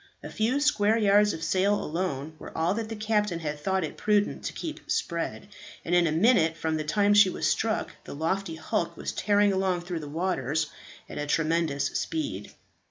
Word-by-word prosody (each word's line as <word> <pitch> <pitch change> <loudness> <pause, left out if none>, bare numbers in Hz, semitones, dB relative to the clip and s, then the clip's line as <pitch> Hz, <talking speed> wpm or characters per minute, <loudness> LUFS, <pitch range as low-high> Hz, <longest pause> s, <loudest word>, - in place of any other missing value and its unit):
A - - -7
few 235 +6 +1
square 225 -7 +3
yards 210 -1 +4
of 160 -3 -6
sail 195 +2 +2
alone 155 -5 -3
were - - -9
all 165 +3 +2
that 220 +1 -4
the 225 - -4
captain 210 -5 0
had 150 -1 -4
thought 190 +4 0
it 155 - -5
prudent 210 -1 +1
to - - -2
keep 315 -2 -7
spread, 170 +3 -2 0.4
and 170 - -2
in 175 -1 +5
a - - 0
minute 165 -2 +3
from 160 0 -1
the 155 - -2
time 205 +6 +2
she 205 -2 +7
was - - -3
struck 220 -1 0
the - - -7
lofty 165 +3 -2
hulk 185 +7 -2
was - - -3
tearing 205 -1 +2
along 190 -2 0
through 175 -1 -4
the 150 -2 -7
waters 160 -3 -1 0.4
at - - -7
a 150 - -3
tremendous 160 -2 +1
speed. 140 -11 -3
180 Hz, 195 wpm, -27 LUFS, 160-205 Hz, 0.4 s, she